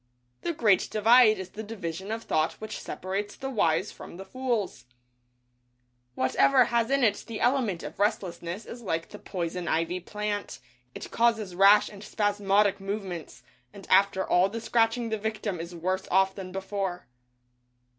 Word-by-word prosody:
The 345 - -1
Great 215 - +3
Divide 220 +1 +5
is 190 -1 -6
the 215 - -7
division 195 -3 -6
of 225 +1 -3
thought 155 -5 +1
which 215 0 -7
separates 195 +3 -4
the 270 0 -5
Wise 190 -3 +1
from - - -11
the 195 - -8
Fools. 240 -2 -2 1.3
Whatever 140 +1 +4
has 235 -1 +1
in 275 -1 +2
it 210 -3 +2
the 230 -2 -5
element 245 -9 +1
of - - -8
restlessness 190 -2 -2
is 240 - -9
like 165 -6 -3
the 210 - -10
poison 175 -1 -4
ivy 165 +3 0
plant; 210 +2 -4 0.4
it - - -8
causes 225 -5 +1
rash 195 +3 +6
and 205 0 -11
spasmodic 205 -1 +1
movements, 195 -4 -6 0.3
and 200 -2 -11
after 190 0 +4
all 180 +2 +4
the 230 +3 -5
scratching 230 +1 +1
the 220 -1 -2
victim 215 -3 -3
is 170 +1 -7
worse 185 +3 -2
off 190 +1 +3
than 190 -2 -8
before. 195 -1 -3
200 Hz, 155 wpm, -27 LUFS, 185-220 Hz, 1.3 s, rash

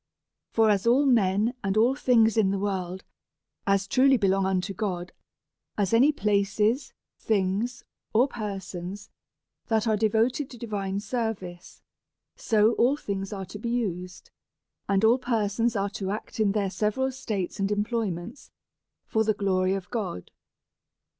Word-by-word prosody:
For 220 -1 +3
as 200 +2 0
all 260 +5 +4
men 220 -2 +3
and 195 +1 0
all 235 +4 +4
things 235 -6 +3
in 215 -4 +3
the 195 - 0
world 190 -2 -3 0.6
as 195 0 +2
truly 265 +4 +4
belong 195 -2 +2
unto 190 +1 -1
God 180 -3 -3 0.7
as 200 0 0
any 260 +6 +6
places, 210 +2 +1 0.3
things, 215 +4 -1 0.3
or 245 +5 +4
persons, 195 -3 -6 0.6
that 225 0 +1
are 220 - +3
devoted 225 +6 +1
to 245 - -11
divine 200 -4 -3
service; 205 -6 -5 0.5
so 220 0 +3
all 260 +5 +4
things 195 -6 -4
are 195 -2 -5
to 190 +3 -9
be 235 - -3
used, 185 -7 -3 0.6
and 195 +1 +2
all 235 +4 +5
persons 230 -1 0
are 200 0 -1
to 195 -2 -4
act 215 +2 -5
in 205 -2 +2
their 200 -3 0
several 220 +7 0
states 210 -7 -4
and 195 +1 0
employments 210 - -3 0.6
for 220 - +1
the 215 -1 +1
glory 190 -2 +1
of 190 -2 -5
God. 200 - -4
210 Hz, 145 wpm, -26 LUFS, 195-230 Hz, 0.7 s, any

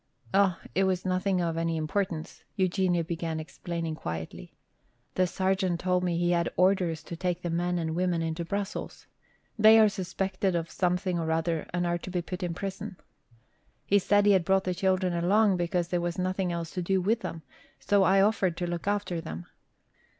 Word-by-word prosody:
"Oh, 195 -3 +4 0.2
it 190 +1 +2
was 185 -1 0
nothing 185 0 +1
of 165 -1 -1
any 165 0 0
importance," 160 +1 -3
Eugenia 185 -2 +1
began 165 -1 -3
explaining 165 0 -4
quietly. 80 - -6 0.6
"The 185 0 +2
sergeant 190 -1 0
told 180 0 +1
me 175 -2 0
he 175 0 +1
had 170 -1 +1
orders 180 -4 +2
to 170 - -7
take 180 +1 -2
the 175 - -2
men 175 +1 0
and 160 -2 -2
women 175 -2 0
into 165 +1 -2
Brussels. 200 +3 -4 0.5
They 220 +1 +8
are 215 - +7
suspected 190 0 -2
of 165 -1 -2
something 180 0 0
or 160 -1 -2
other 165 0 -1
and 175 0 -1
are 175 0 0
to 185 - -8
be 180 -1 -2
put 180 +1 -6
into 175 -2 -3
prison. 195 0 -5 0.9
He 205 - +4
said 205 +1 +3
he 205 - +6
had 190 -3 +4
brought 190 +2 +2
the 185 - -1
children 185 0 +1
along 190 +3 +3
because 175 0 -1
there 175 -1 0
was 175 -1 -2
nothing 185 0 -1
else 170 -1 -4
to 180 - -3
do 190 +2 +1
with 215 +5 +1
them, 165 -7 -6 0.4
so 205 -1 +2
I 195 +1 +5
offered 195 -4 +2
to 175 - -2
look 175 +2 -4
after 200 -4 -1
them." 85 - -7
180 Hz, 190 wpm, -28 LUFS, 170-190 Hz, 0.9 s, They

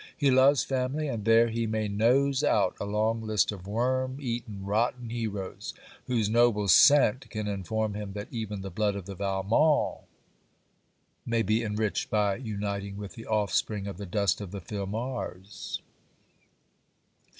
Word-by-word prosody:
He 140 -3 +3
loves 135 +2 +5
family; 135 +3 -1
and 115 -6 -4
there 115 +1 +5
he 115 0 -1
may 110 -1 -1
nose 130 +7 +2
out 95 -9 +2
a - - -1
long 110 +2 0
list 110 -2 +1
of 95 -3 -9
worm 130 +4 0
eaten 115 -7 -4
rotten 115 +3 0
heroes, 105 -5 -4 0.3
whose 115 -4 +1
noble 110 -2 +3
scent 130 +6 +6
can 110 -2 -4
inform 105 +2 -2
him 105 -1 -5
that 105 0 -6
even 105 -4 -4
the 95 0 -6
blood 105 +2 0
of 100 -3 -6
the 100 0 -7
Valmonts 100 - +1 1.2
may 115 -1 0
be 110 +3 +1
enriched 105 -1 -1
by 105 -2 +2
uniting 100 -4 -4
with 100 -1 -7
the 115 - -10
offspring 105 -1 0
of 100 -3 -6
the 100 0 -7
dust 100 +1 +1
of 100 - -6
the 100 +2 -6
Filmars. 100 0 -5
110 Hz, 150 wpm, -28 LUFS, 100-120 Hz, 1.2 s, scent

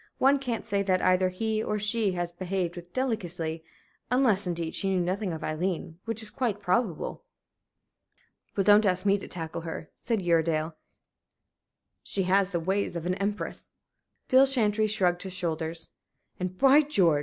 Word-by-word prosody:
One 275 +1 +4
can't 245 -4 -3
say 200 -3 0
that 185 -2 +1
either 185 0 +3
he 215 +4 -1
or 210 - -1
she 210 -1 +3
has 175 -1 -3
behaved 180 0 -3
with 175 0 -10
delicacy 175 -11 -2 0.5
unless, 230 -7 +2
indeed, 170 -2 -3
she 195 - 0
knew 190 -1 +1
nothing 185 +2 -1
of 160 -1 -6
Aileen, 165 0 -3
which 225 -1 0
is 215 - 0
quite 230 -6 -1
probable." 185 -2 -1 1.3
"Well, 195 - +2
don't 210 +2 +6
ask 185 +1 0
me 200 0 +3
to - - -9
tackle 165 -2 -5
her," 160 -1 -7
said 225 -5 -2
Uredale. 165 -2 +1 1.3
"She 195 - -1
has 190 +1 +3
the 175 -3 -1
ways 190 +3 -1
of 170 -1 -4
an 180 - +1
empress." 200 +2 -4 0.6
Bill 265 +1 +6
Chantrey 215 -5 +2
shrugged 180 -4 +1
his 190 -2 -5
shoulders. 165 -2 -3 0.5
"And, 185 0 -4
by 275 +5 +6
George! 185 - +3
190 Hz, 165 wpm, -28 LUFS, 175-215 Hz, 1.3 s, don't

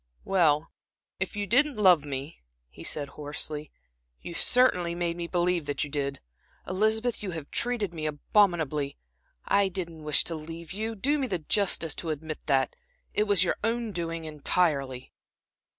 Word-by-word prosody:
"Well, 165 -5 +3 0.5
if 190 +1 -2
you 205 0 -1
didn't 270 +6 +4
love 180 -7 +5
me," 140 +2 -5 0.3
he - - -12
said, 145 -2 0
hoarsely, 150 0 -3 0.5
"you 170 - -7
certainly 180 -6 +3
made 170 -1 -1
me 170 0 -4
believe 175 -3 +1
that 145 - -1
you 150 - -6
did. 140 -1 -2 0.5
Elizabeth, 220 +5 +1
you 205 - -4
have 150 -3 -8
treated 235 -7 0
me 155 -2 -3
abominably. 155 -3 +1 0.5
I 200 -1 +3
didn't 170 -4 -5
wish 150 -1 +2
to 170 - -1
leave 165 +2 -7
you 220 +3 -3
do 285 +8 +1
me 265 - 0
the 190 - -1
justice 170 -1 +2
to 165 - -3
admit 155 0 -4
that 135 -3 +2 0.4
it 210 - +2
was 200 -4 +4
your 175 - 0
own 230 0 0
doing 165 -2 -3
entirely." 145 -4 0
170 Hz, 160 wpm, -28 LUFS, 150-200 Hz, 0.5 s, love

